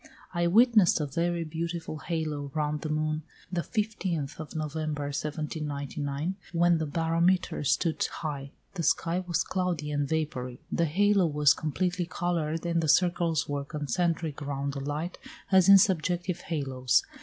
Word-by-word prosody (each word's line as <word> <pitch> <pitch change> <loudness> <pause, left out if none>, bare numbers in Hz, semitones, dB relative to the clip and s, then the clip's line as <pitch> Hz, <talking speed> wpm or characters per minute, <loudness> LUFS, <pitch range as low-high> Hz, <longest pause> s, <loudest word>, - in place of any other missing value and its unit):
I 170 -1 +1
witnessed 215 -2 +5
a 150 - 0
very 170 +4 -1
beautiful 165 0 -4
halo 155 -4 -3
round 150 -1 -1
the 155 - -4
moon 155 0 0 0.3
the 175 -2 0
15th 180 -9 -2
of 155 0 -7
November, 155 -1 -2
1799, 145 +2 -3 0.2
when 170 0 +4
the 160 - -1
barometer 165 +3 +1
stood 150 +4 +1
high; 140 -3 -5 0.2
the 180 - -3
sky 165 +2 +1
was 170 -3 +1
cloudy 175 -5 -2
and 145 -1 -1
vapoury. 145 -6 -2
The 170 - +2
halo 195 +3 +3
was 145 -2 +4
completely 175 +4 -1
coloured, 165 -2 -2
and 170 -1 +1
the 160 - -1
circles 170 -2 +3
were 145 -1 -2
concentric 155 +2 -2
round 140 0 -3
the 140 - -4
light 150 +5 -4 0.3
as 190 0 +6
in 195 - +11
subjective 180 -1 +1
halos. 135 -5 +1
160 Hz, 145 wpm, -28 LUFS, 145-175 Hz, 0.3 s, in